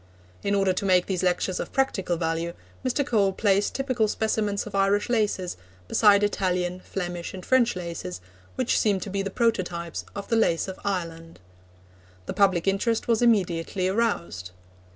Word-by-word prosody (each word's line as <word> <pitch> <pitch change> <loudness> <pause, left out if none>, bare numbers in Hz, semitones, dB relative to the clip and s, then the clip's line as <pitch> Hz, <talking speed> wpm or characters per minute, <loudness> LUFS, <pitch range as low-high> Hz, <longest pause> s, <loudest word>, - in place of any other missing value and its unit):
In 200 - 0
order 195 -2 +2
to 185 - -3
make 185 -2 +4
these 185 -3 -2
lectures 180 0 0
of - - -4
practical 195 -10 0
value, 165 +1 -2 0.3
Mr. 260 +2 0
Cole 205 -6 +2
placed 200 0 +1
typical 255 -5 +1
specimens 210 -1 -1
of 210 - -9
Irish 195 +3 +2
laces 210 - 0 0.3
beside 205 - +5
Italian, 180 -3 0
Flemish, 175 -1 -5
and 185 - -9
French 250 -4 +3
laces, 170 - -5 0.4
which 255 -2 +1
seem 205 -3 +2
to 195 - -5
be 200 0 -1
the 195 - -3
prototypes 180 -6 -1
of 200 0 -6
the 230 - +1
lace 185 -7 +2
of 190 - -7
Ireland. 165 -4 -4 0.9
The - - -4
public 190 -3 +2
interest 220 +4 +1
was 230 -1 +2
immediately 185 -5 +1
aroused. 180 - -1
195 Hz, 160 wpm, -26 LUFS, 175-215 Hz, 0.9 s, beside